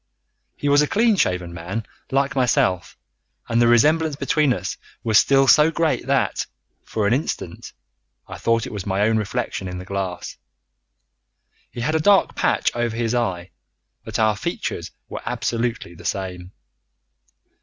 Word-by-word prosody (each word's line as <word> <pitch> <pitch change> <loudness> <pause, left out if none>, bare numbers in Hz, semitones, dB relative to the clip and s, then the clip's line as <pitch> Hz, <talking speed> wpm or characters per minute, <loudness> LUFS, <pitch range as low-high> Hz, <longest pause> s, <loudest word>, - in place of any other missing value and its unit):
He 145 - -3
was 145 +1 +5
a 150 - +2
clean 220 +4 +3
shaven 90 - 0
man 95 +6 -5 0.2
like 135 0 +1
myself, 110 -8 +1 0.5
and 115 0 +2
the 120 - +5
resemblance 150 +6 +4
between 150 0 +1
us - - -2 0.3
was 110 -1 +5
still 135 0 +4
so 150 +2 +6
great 165 -1 0
that, - - +1 0.4
for 110 -2 -2
an 100 - +3
instant, 140 +5 -3 0.6
I - - -8
thought 115 -1 +1
it - - -7
was 100 -3 -4
my 95 +1 0
own 110 +1 +3
reflection 100 -2 -3
in 90 0 -5
the 90 - -7
glass. 95 -2 -4 1.3
He 120 - -7
had 155 +7 0
a 160 - +2
dark 195 +5 +4
patch - - +1
over 120 -1 -1
his 115 0 -1
eye, 95 -7 -1 0.5
but - - -4
our 110 -1 +3
features 100 - -4 0.2
were - - -6
absolutely 115 -6 -2
the 85 - -14
same. 90 -2 -4
115 Hz, 155 wpm, -22 LUFS, 95-140 Hz, 1.3 s, so